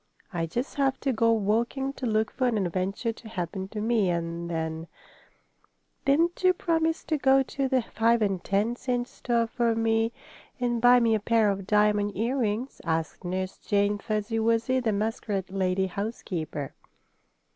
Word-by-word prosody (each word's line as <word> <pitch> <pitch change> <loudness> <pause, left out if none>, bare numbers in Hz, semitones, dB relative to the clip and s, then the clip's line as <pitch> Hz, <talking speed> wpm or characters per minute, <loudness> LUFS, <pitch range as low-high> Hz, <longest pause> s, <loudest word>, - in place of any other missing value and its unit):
"I 165 -1 -1
just 245 - -3
have 270 -1 +1
to 270 - +1
go 230 0 +3
walking 230 +6 0
to 260 - -4
look 215 -1 +1
for 255 0 0
an 235 -3 +1
adventure 195 +4 -1
to 225 0 -12
happen 190 -1 -4
to 210 +2 -6
me, 220 -3 +2
and 170 0 -2
then 160 0 -3 0.6
" - - -42
"Didn't 330 +6 +2
you 370 0 +6
promise 325 -2 0
to 310 -2 -1
go 270 0 +5
to 270 +1 -2
the 260 -2 +1
five 230 +1 +2
and 195 -3 -1
ten 205 +4 +1
cent 245 -1 -2
store 235 -2 0
for 230 0 0
me, 225 0 +1 0.5
and 240 -2 0
buy 245 +1 +7
me 230 -2 +3
a 220 - +2
pair 220 -1 +3
of 195 -1 -5
diamond 210 -1 +2
earrings?" 235 +1 -1
asked 160 +2 -2
Nurse 185 +1 -3
Jane 205 0 +1
Fuzzy 215 +2 -2
Wuzzy, 230 +3 +2
the 235 -3 0
muskrat 205 -2 -2
lady 190 0 +1
housekeeper. 180 - -4
220 Hz, 165 wpm, -27 LUFS, 195-245 Hz, 0.6 s, buy